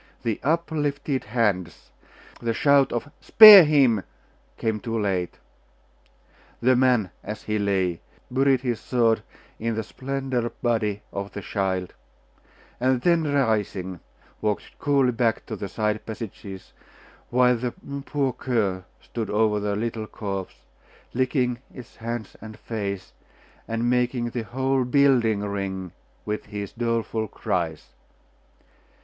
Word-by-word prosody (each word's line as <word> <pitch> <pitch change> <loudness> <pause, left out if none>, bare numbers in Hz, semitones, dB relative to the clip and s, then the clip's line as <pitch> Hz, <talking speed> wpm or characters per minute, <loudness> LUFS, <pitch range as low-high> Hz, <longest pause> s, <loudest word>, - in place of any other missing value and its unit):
The 115 -3 -1
uplifted 150 -3 -1
hands, 100 -8 -1 0.5
the 115 -1 -2
shout 140 0 +4
of 120 +4 -3
'Spare 210 -5 +11
him!' 135 -9 +3 0.5
came 110 -1 -1
too 115 +2 -3
late. 95 -4 -1 1.2
The 130 +2 +4
man, 125 -6 +3
as 105 +2 -6
he 105 0 -1
lay, 95 -4 0 0.3
buried 135 0 +3
his 120 -4 -2
sword 115 -3 +1 0.4
in 115 0 -1
the 110 - -2
slender 130 0 -3
body 110 -5 -1
of 100 0 -5
the 100 - -6
child, 95 -2 -2 0.9
and 130 0 +2
then 165 -3 +2
rising, 105 -9 0 0.4
walked 105 -1 -3
coolly 140 -3 +3
back 115 -2 0
to - - -5
the 100 - -6
side 105 -1 -1
passages, 105 -4 -8 0.6
while 125 0 +4
the 120 +1 -4 0.3
poor 140 -3 -1
cur 105 -8 -1 0.2
stood 115 -3 -5
over 105 0 +2
the 100 0 -1
little 110 0 -3
corpse, 100 -3 -6 0.5
licking 125 -1 0
its 125 -3 -12
hands 115 -1 -5
and 110 0 -10
face, 100 -4 -5 0.5
and 115 +1 -1
making 125 -1 0
the 115 -2 -4
whole 130 +2 0
building 125 -5 +3
ring 95 -3 -4 0.3
with 105 0 -3
his 105 -1 -5
doleful 115 -1 -1
cries. 85 -6 -3
115 Hz, 125 wpm, -24 LUFS, 105-130 Hz, 1.2 s, Spare